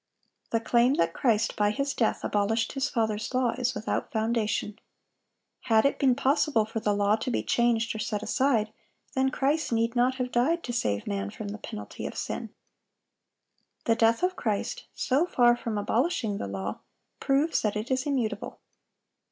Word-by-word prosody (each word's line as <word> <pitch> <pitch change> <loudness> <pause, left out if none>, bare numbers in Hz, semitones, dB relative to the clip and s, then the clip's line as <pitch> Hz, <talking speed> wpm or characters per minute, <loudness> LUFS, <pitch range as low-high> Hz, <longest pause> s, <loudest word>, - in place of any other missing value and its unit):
(781) 230 0 0
The - - -14
claim 240 +2 +4
that 165 - -11
Christ 230 -3 +1
by 210 0 +2
His 275 +7 -1
death 225 - 0
abolished 215 +2 0
His 270 +1 -1
Father's 220 -2 -1
law, 255 -2 +2
is 250 0 -2
without 210 +2 -2
foundation. 220 -2 -1 0.9
Had 225 -2 +4
it 280 - +1
been 260 -3 +4
possible 275 -3 +2
for 225 +1 -4
the 210 -1 +1
law 205 +1 +3
to 225 - -3
be 245 - -1
changed 235 -1 +1
or 220 - -6
set 210 -1 -2
aside, 220 -1 +1 0.4
then 265 -1 +2
Christ 285 +4 0
need 230 +1 +1
not 250 +2 +3
have 250 -1 -3
died 295 +9 +1
to 240 - -4
save 105 - -1
man 100 0 -2
from 205 - -7
the 210 +2 -6
penalty 215 0 -7
of - - -8
sin. - - -4 1.4
The 230 - +3
death 230 +5 +3
of 365 0 +1
Christ, 230 - -2
so 285 +7 +1
far 240 -6 +4
from 230 -3 -4
abolishing 225 - 0
the - - -3
law, 95 0 -4 0.4
proves 280 +4 +2
that 210 -1 0
it 215 +5 -4
is 260 +2 0
immutable. 255 -6 -2
230 Hz, 175 wpm, -27 LUFS, 215-260 Hz, 1.4 s, claim